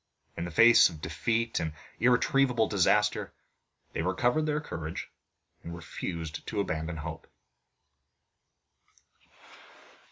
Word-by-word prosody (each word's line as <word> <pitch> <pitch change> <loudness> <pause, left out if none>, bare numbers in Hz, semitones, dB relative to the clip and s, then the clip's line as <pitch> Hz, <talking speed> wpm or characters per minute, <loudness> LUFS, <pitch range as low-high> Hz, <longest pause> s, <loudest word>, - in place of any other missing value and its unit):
In 85 - -4
the - - -5
face 115 +7 +7
of 80 -3 -10
defeat 115 +7 -1
and 80 -1 -3 0.3
irretrievable 125 -1 +3
disaster 105 +1 +2 0.6
they - - -2
recovered 120 - +1
their 150 0 0
courage, 85 - -6 0.5
and 85 +1 -7
refused 80 0 -6
to 105 - -3
abandon 80 -3 -2
hope. 80 +1 -7
95 Hz, 100 wpm, -29 LUFS, 80-120 Hz, 0.6 s, face